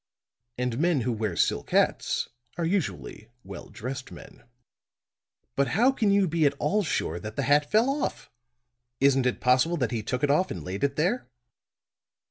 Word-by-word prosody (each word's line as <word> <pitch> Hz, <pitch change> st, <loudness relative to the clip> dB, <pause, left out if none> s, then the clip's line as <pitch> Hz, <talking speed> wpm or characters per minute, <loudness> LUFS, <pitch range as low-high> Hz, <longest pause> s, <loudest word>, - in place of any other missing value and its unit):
And 125 Hz, -1 st, -2 dB
men 165 Hz, -4 st, +2 dB
who 125 Hz, -, -1 dB
wear 110 Hz, -5 st, -2 dB
silk -, -, 0 dB
hats -, -, +1 dB, 0.3 s
are 170 Hz, -, -1 dB
usually 165 Hz, -, -3 dB
well 95 Hz, -1 st, -9 dB
dressed 130 Hz, +3 st, -6 dB
men." -, -, -13 dB, 1.1 s
"But 140 Hz, 0 st, +2 dB
how 250 Hz, +4 st, +5 dB
can 225 Hz, -6 st, 0 dB
you 200 Hz, -1 st, +3 dB
be 160 Hz, -2 st, +2 dB
at 140 Hz, -, -1 dB
all 210 Hz, +7 st, +1 dB
sure 85 Hz, -, -2 dB
that 110 Hz, +4 st, -7 dB
the 140 Hz, -, -1 dB
hat 145 Hz, +2 st, +3 dB
fell 220 Hz, +4 st, +3 dB
off? 275 Hz, +1 st, -2 dB, 0.7 s
Isn't 135 Hz, -1 st, +3 dB
it 125 Hz, -, -1 dB
possible 130 Hz, +7 st, +3 dB
that 125 Hz, -7 st, -1 dB
he 115 Hz, -2 st, -2 dB
took 125 Hz, +5 st, -3 dB
it 145 Hz, -, +3 dB
off 185 Hz, +6 st, +2 dB
and 85 Hz, -, -6 dB
laid 95 Hz, -, -5 dB
it 140 Hz, 0 st, +1 dB
there?" 185 Hz, -, 0 dB
140 Hz, 175 wpm, -27 LUFS, 120-175 Hz, 1.1 s, how